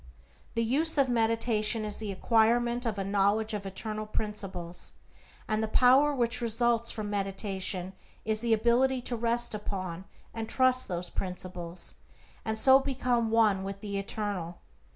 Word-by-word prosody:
The 230 - +1
use 295 +8 +2
of 275 -2 +3
meditation 225 -1 +1
is 210 - -3
the 215 -2 -3
acquirement 235 +4 +2
of 215 -2 -2
a 195 - -1
knowledge 205 +3 +1
of 200 -2 -4
eternal 215 +2 -5
principles, 190 -5 -5 0.5
and 215 0 0
the 220 - 0
power 260 +6 +5
which 240 -3 0
results 235 0 +2
from 215 -2 -4
meditation 195 -2 -3 0.3
is 215 0 -1
the 235 -1 0
ability 240 +4 +3
to 245 - -3
rest 235 +1 +1
upon 190 -4 -5 0.3
and 225 -1 -5
trust 255 0 +3
those 180 -1 -4
principles, 180 -2 -5 0.5
and 220 0 -2
so 265 +4 +7
become 250 -4 0
one 215 -4 +3
with 195 0 -6
the 200 -2 -3
Eternal. 195 -4 -4
220 Hz, 150 wpm, -29 LUFS, 195-235 Hz, 0.5 s, so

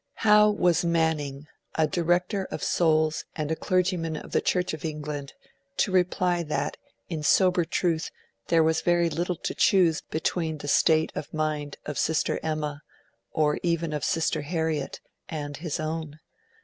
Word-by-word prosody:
How 210 0 +7
was 180 -4 +2
Manning, 160 -4 0 0.3
a 160 - +3
director 175 +5 0
of - - -6
souls, 155 -2 +2
and 155 -1 -2
a - - +1
clergyman 180 -3 0
of - - -9
the - - +2
Church 180 -2 0
of 155 - -6
England, 150 -3 -5 0.4
to 200 - +2
reply 180 -1 +2
that 150 -3 -2 0.3
in 160 -3 -4
sober 180 +3 +4
truth 165 -1 0 0.4
there 165 -1 +4
was 160 0 +2
very 175 -1 +2
little 175 +4 -1
to - - -4
choose 175 -5 +3
between 160 0 -2
the 145 - -8
state 160 +2 +3
of - - -6
mind 155 -2 -2
of 150 - -3
Sister 160 0 +1
Emma, 155 -2 -3 0.5
or 150 -1 +1
even 170 -2 0
of 150 -3 -3
Sister 165 -2 0
Harriet, 160 -1 -2 0.3
and 145 -3 -5
his 160 -1 -4
own? 155 -1 -4
160 Hz, 155 wpm, -26 LUFS, 150-175 Hz, 0.5 s, How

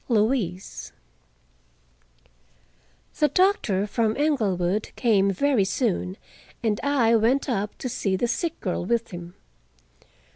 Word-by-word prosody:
LOUISE 215 -5 -1 2.3
The 300 - +5
doctor 295 - +2
from 220 +1 0
Englewood 210 - 0
came 205 -5 +3
very 240 +3 +2
soon, 190 -2 -1 0.5
and 215 -3 +1
I 255 -5 +3
went 235 +6 +2
up 210 -5 -2
to - - -4
see 200 -5 -1
the 240 +6 0
sick 335 +6 -2
girl 180 -2 -2
with 230 +4 -1
him. 175 0 -8
220 Hz, 110 wpm, -25 LUFS, 195-260 Hz, 2.3 s, The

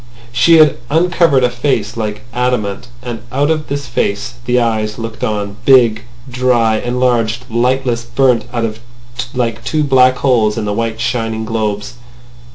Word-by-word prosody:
She 165 +7 +5
had 155 -3 +5
uncovered 165 -3 +3
a 125 - +3
face 120 -5 -1
like 105 -2 -4
adamant. 125 -3 -1 0.2
And 120 -3 -5
out 145 +4 +1
of 155 -1 -2
this 140 0 -3
face 105 -1 -2
the 125 0 +2
eyes 110 -2 -1
looked 115 -1 -6
on, 105 -1 -2
big, 120 -4 +4 0.2
dry, 125 -3 +1
enlarged, 120 -1 0
lightless, 120 0 0
burnt 120 0 +1
out 115 -3 -2 0.6
like 115 -3 -2
two 155 -1 0
black 130 -2 +4
holes 115 -6 +2
in 110 - -2
the 105 - -1
white, 115 0 -2
shining 115 -1 -2
globes. 105 -2 -2
120 Hz, 150 wpm, -15 LUFS, 110-130 Hz, 0.6 s, She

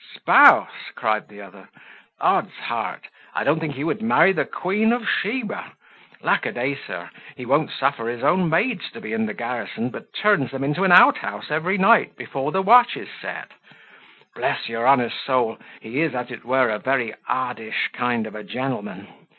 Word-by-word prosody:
"Spouse!" - - +5
cried 110 -1 -1
the 105 -1 -13
other; 100 - -15 0.5
"odds - - +1
heart! - - -4 0.3
I - - -1
don't 150 +3 +2
think 155 -3 -4
he 140 - -4
would 165 +7 -2
marry 190 -5 +4
the 180 - -1
queen 210 +5 0
of 240 -1 -3
Sheba. 215 0 -2 0.5
Lack - - +1
a - - -2
day! 130 +3 -2
sir, 140 - -8 0.2
he 125 - -8
won't 140 +4 +1
suffer 135 -4 -1
his 120 0 -5
own 180 -2 +2
maids 210 +6 0
to - - -9
be 110 - -6
in 110 0 -1
the 105 - -6
garrison, 120 0 -4
but 220 - -11
turns 205 - +1
them 135 0 -5
into 150 +7 -1
an 190 - +3
out 180 +1 +8
house 105 +5 -6
every 170 +6 0
night 215 +4 +4
before 140 +2 -4
the 190 +2 0
watch 240 +5 +6
is - - -9
set. - - -7 0.8
Bless - - -2
your 115 +1 -2
honour's 125 -3 +4
soul, 125 -4 -1 0.2
he 125 +7 -3
is, 160 -5 0
as 125 0 -4
it 120 - -9
were, 130 0 +2
a 105 -1 -2
very 125 -4 -1
oddish 125 -3 -2
kind 120 -2 -1
of 110 - -9
a 105 0 -8
gentleman. 130 -3 -5
135 Hz, 190 wpm, -22 LUFS, 120-180 Hz, 0.8 s, out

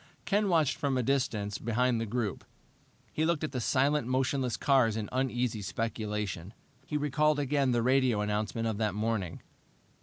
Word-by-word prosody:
Ken 205 0 +2
watched 160 -5 +2
from 140 -2 0
a 125 - +1
distance 110 -6 -1
behind 120 +1 +1
the 115 - -3
group. 110 -2 -2 0.7
He 155 - 0
looked 160 -1 +1
at 155 - -2
the 130 -3 -3
silent, 140 +2 +2
motionless 130 -1 0
cars 125 -6 +3
in 105 -2 -3
uneasy 125 -3 -1
speculation. 105 -3 -3 0.3
He 150 - -1
recalled 150 +1 +2
again 140 -1 +1
the 120 -2 +2
radio 130 -4 +3
announcement 105 +2 -1
of 110 -2 -2
that 105 -3 0
morning. 105 -5 -2
125 Hz, 160 wpm, -30 LUFS, 110-140 Hz, 0.7 s, cars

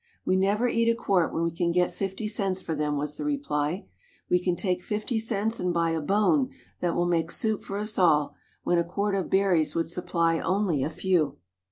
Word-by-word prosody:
"We 185 - +2
never 200 +5 +2
eat 230 -1 +2
a 230 - +3
quart 195 -7 +1
when 165 - -1
we 170 - 0
can 170 +1 0
get 180 +1 +1
fifty 195 +2 -3
cents 195 -3 -1
for 165 - -4
them," 150 -1 -1
was 150 +1 -3
the - - -4
reply. 190 - -1 0.5
"We 180 - +5
can 180 -1 0
take 180 -1 0
fifty 215 +4 -2
cents 220 0 -1
and 180 0 0
buy 170 -1 +1
a 165 -1 -1
bone 210 - +2 0.3
that 175 -1 0
will 175 - +1
make 170 -2 +1
soup 220 +3 +1
for 200 - -5
us 210 0 -1
all, 150 -5 +3 0.3
when 175 - +2
a - - +2
quart 200 +4 -2
of 195 -2 -1
berries 190 -5 +2
would 165 -1 0
supply 170 -2 0
only 185 -7 0
a - - -1
few." 170 -2 0
180 Hz, 215 wpm, -27 LUFS, 165-205 Hz, 0.5 s, We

